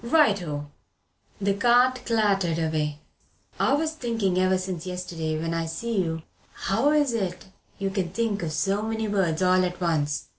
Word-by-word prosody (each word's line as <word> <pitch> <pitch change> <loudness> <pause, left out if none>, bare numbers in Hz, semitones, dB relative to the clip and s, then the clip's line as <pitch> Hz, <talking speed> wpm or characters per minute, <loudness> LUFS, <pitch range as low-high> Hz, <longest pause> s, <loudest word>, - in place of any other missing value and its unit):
Right 235 - +4
oh!" 145 -3 -4 0.7
The 200 0 +1
cart 245 +4 +3
clattered 200 -7 +2
away. 155 -2 -1 0.6
"I - - +3
was 310 +2 +1
thinking 225 -10 0
ever 185 0 +3
since 185 -2 -4
yesterday 165 -3 -3
when 165 +1 -2
I 165 0 -1
see 210 +7 -2
you 160 -2 -3 0.3
how 225 +9 +1
is 295 -4 +3
it 185 -5 -2 0.3
you 195 -1 -2
can 190 -3 -1
think 210 0 -1
o' - - -1
so 195 +6 0
many 220 0 -2
words 185 -5 +1
all 185 0 +4
at 180 0 -2
once. 155 -5 0
190 Hz, 170 wpm, -26 LUFS, 165-225 Hz, 0.7 s, Right